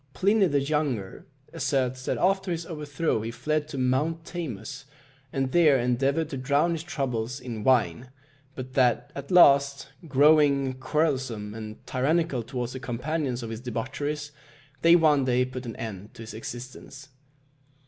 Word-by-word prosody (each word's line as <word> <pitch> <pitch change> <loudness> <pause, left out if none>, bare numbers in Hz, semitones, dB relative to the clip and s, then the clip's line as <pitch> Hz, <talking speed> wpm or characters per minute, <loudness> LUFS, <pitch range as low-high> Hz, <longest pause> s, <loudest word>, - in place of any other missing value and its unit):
Pliny 200 - +3
the 145 -3 +2
Younger 140 -9 -2 0.3
asserts 130 -1 -1
that - - -1
after 190 +1 +1
his 170 -1 -2
overthrow 150 -5 -2
he 110 - -4
fled 150 +5 -2
to 155 - -7
Mount 145 +6 0
Tamus, 135 - -6 0.5
and 135 -1 -1
there 155 -4 +5
endeavoured 135 +6 0
to 135 - -4
drown 140 +6 +2
his 165 -2 -2
troubles 130 -6 -3
in 120 -4 -6
wine; 125 -2 +2 0.5
but 130 0 -7
that 130 +2 +2
at 140 -1 -8
last, 140 -5 +5 0.2
growing 140 -1 +4
quarrelsome 130 -10 -1
and 110 -1 -9
tyrannical 145 +1 0
towards 120 +1 -4
the 130 - -5
companions 130 +1 -3
of 115 - -5
his 115 0 -6
debaucheries, 145 +5 -4 0.5
they 170 +1 +7
one 155 -5 +4
day 125 0 +2
put 130 -1 -7
an 115 - -6
end 105 -2 -7
to 115 - -9
his 110 - -9
existence. 130 +5 -9
135 Hz, 150 wpm, -26 LUFS, 125-150 Hz, 0.5 s, they